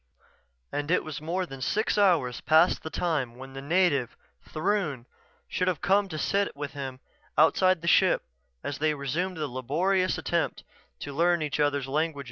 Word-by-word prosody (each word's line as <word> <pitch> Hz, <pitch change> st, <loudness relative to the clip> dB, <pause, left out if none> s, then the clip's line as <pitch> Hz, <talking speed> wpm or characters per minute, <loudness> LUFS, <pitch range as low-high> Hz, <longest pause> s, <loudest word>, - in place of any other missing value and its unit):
And 145 Hz, +1 st, -3 dB
it 180 Hz, -, +2 dB
was 155 Hz, -2 st, -6 dB
more 180 Hz, +4 st, -2 dB
than 135 Hz, -5 st, -10 dB
six 215 Hz, -, 0 dB
hours 175 Hz, -12 st, +2 dB
past 160 Hz, +3 st, +4 dB
the 160 Hz, -, -6 dB
time 150 Hz, -9 st, -1 dB
when 135 Hz, +1 st, -10 dB
the 135 Hz, -, -7 dB
native, 145 Hz, -5 st, +1 dB, 0.3 s
Throon, 155 Hz, -, -1 dB, 0.4 s
should 180 Hz, -, -1 dB
have 180 Hz, -5 st, 0 dB
come 195 Hz, +1 st, +2 dB
to 155 Hz, -, -5 dB
sit 200 Hz, +3 st, 0 dB
with 145 Hz, 0 st, -5 dB
him 135 Hz, -2 st, -6 dB, 0.4 s
outside 185 Hz, +2 st, +4 dB
the -, -, -4 dB
ship -, -, +4 dB, 0.4 s
as 140 Hz, -, -4 dB
they 155 Hz, 0 st, +1 dB
resumed 160 Hz, +7 st, -2 dB
the 155 Hz, -1 st, -2 dB
laborious 170 Hz, +9 st, 0 dB
attempt -, -, -1 dB, 0.4 s
to 140 Hz, -, -6 dB
learn 170 Hz, +2 st, +2 dB
each 150 Hz, -1 st, -3 dB
other's 145 Hz, -2 st, +1 dB
language. 155 Hz, +2 st, -1 dB
155 Hz, 170 wpm, -27 LUFS, 140-180 Hz, 0.4 s, past